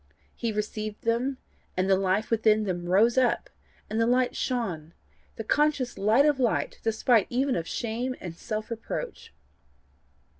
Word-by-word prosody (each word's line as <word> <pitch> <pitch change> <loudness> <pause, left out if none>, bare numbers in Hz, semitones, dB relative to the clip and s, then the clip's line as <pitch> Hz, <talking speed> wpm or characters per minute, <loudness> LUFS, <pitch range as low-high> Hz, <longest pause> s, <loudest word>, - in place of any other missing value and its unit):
He 230 - -2
received 215 0 -4
them, 245 +4 0 0.4
and 185 +1 +1
the 195 - +5
life 195 +3 0
within 220 -1 +3
them 175 -3 -3
rose 225 +7 +4
up, 250 -2 +1 0.4
and 220 +2 -1
the 230 - +3
light 250 +1 +2
shone 180 - -3 0.4
the 225 - -5
conscious 290 0 +1
light 220 +8 +4
of 295 -3 +3
light, 245 -3 0
despite 225 -1 +2
even 260 +2 +1
of 165 - -3
shame 240 +3 -2
and 175 -3 -7
self 215 +4 -5
reproach. 230 -1 -5
225 Hz, 150 wpm, -27 LUFS, 205-245 Hz, 0.4 s, the